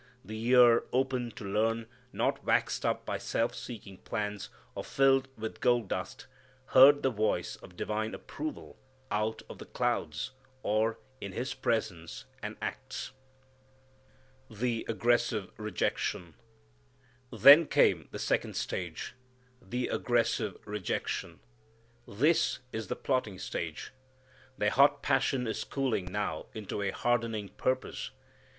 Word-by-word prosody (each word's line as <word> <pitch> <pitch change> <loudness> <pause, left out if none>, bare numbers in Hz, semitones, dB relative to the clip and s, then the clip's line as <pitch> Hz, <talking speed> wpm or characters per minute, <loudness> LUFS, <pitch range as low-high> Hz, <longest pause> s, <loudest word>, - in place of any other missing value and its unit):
The 110 +1 -6
ear 120 -2 +7
open 130 -1 0
to 105 - -7
learn, 110 +3 +1 0.3
not - - 0
waxed - - +1
up - - -1
by - - -2
self 115 +1 0
seeking 100 -5 -8
plans, 105 -2 -4 0.2
or - - -5
filled 135 -1 +3
with 110 0 -6
gold 120 -5 +3
dust, 95 0 -4 0.4
heard 140 +2 +8
the 135 - +3
voice 110 -1 0
of 90 - -14
divine 110 +1 -2
approval 310 -2 -7 0.3
out 105 +1 -1
of - - -10
the - - -8
clouds, 75 +12 -1 0.3
or 110 +2 +1 0.2
in 100 -1 -5
His 125 +5 -2
presence 85 -7 -2 0.2
and - - -5
acts. - - -5 1.4
The 115 +1 -2
Aggressive 120 -3 +1
Rejection. 105 -5 -2 1.0
Then 140 +8 +9
came - - +3
the - - -6
second - - 0
stage, 85 -3 -4 0.5
the 125 0 -2
aggressive - - +1
rejection. 105 -3 -3 0.7
This 155 +10 +2 0.2
is 110 -1 -4
the - - -2
plotting 125 -8 -1
stage. 85 -3 -5 0.7
Their 105 0 +2
hot 140 +2 +5
passion 130 -3 +2
is 110 - -2
cooling 130 -9 -1
now 105 +1 -2
into 105 -1 -4
a 100 - 0
hardening 115 -2 0
purpose. 130 +6 -2
110 Hz, 125 wpm, -31 LUFS, 105-125 Hz, 1.4 s, Then